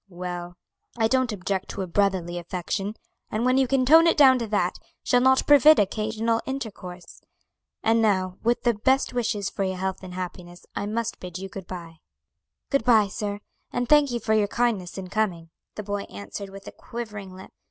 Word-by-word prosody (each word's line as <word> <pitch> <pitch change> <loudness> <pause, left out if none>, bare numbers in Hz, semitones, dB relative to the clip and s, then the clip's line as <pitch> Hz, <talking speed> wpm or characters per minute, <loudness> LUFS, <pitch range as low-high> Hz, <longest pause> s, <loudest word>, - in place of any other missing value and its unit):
"Well, 175 -1 -6 0.4
I 225 -1 +3
don't 255 0 +1
object 195 -1 -3
to 195 - -4
a - - -5
brotherly 180 -2 0
affection, 185 +4 -4 0.3
and 220 +3 -1
when 255 +1 +3
you 265 - +3
can 260 0 +2
tone 325 +5 +7
it 335 - +3
down 265 -3 +7
to 230 - -3
that, 200 -4 0 0.2
shall 245 - +3
not 260 +1 +4
forbid 290 +2 +7
occasional 220 +3 0
intercourse. 200 -10 -7 0.6
And 225 0 +3
now, 185 -4 +1
with 235 +1 +1
the 240 -1 +3
best 260 +6 +1
wishes 215 -5 -1
for 195 - -2
your 190 -1 -2
health 190 0 -3
and 180 -1 -9
happiness, 180 -1 -7
I 200 - -2
must 225 +1 -3
bid 180 -1 -7
you 190 +1 -7
good 190 -2 -9
bye." 170 -3 -8 0.7
"Good 275 -4 +2
bye, 220 -4 +4
sir; 205 0 -4 0.3
and 245 0 -2
thank 295 0 +5
you 240 -1 -2
for 220 - 0
your 215 -1 +3
kindness 210 -6 -1
in 185 -1 -6
coming," 180 -6 -2 0.2
the 210 - -5
boy 205 0 -3
answered 100 - -7
with 195 0 -11
a - - -6
quivering 210 -5 -8
lip. 190 - -12
205 Hz, 195 wpm, -25 LUFS, 185-235 Hz, 0.7 s, tone